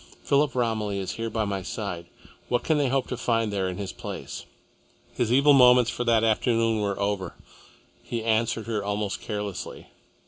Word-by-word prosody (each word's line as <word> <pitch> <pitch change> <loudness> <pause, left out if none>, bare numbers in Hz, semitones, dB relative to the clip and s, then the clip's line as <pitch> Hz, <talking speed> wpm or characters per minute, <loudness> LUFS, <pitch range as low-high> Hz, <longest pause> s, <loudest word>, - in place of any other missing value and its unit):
Philip 140 -2 +2
Romilly 110 -4 0
is 95 -2 -3
here 115 0 -4
by 110 0 -1
my 100 -1 -2
side. 90 -3 -5 0.4
What 120 - +1
can 155 -2 +2
they 140 -3 +2
hope 135 0 +1
to 125 - -3
find 115 -3 0
there 95 -2 0
in 90 - -5
his 100 -2 -4
place?" - - -7 0.7
His 120 -2 0
evil 140 +3 +6
moments 125 -2 +6
for 120 - -3
that 115 -2 +3
afternoon 115 0 +2
were 100 -1 -1
over. 100 -3 -2 0.7
He 115 -2 -4
answered 115 0 +1
her 110 -3 -2
almost 105 0 -2
carelessly. 105 -3 -5
110 Hz, 175 wpm, -26 LUFS, 100-120 Hz, 0.7 s, evil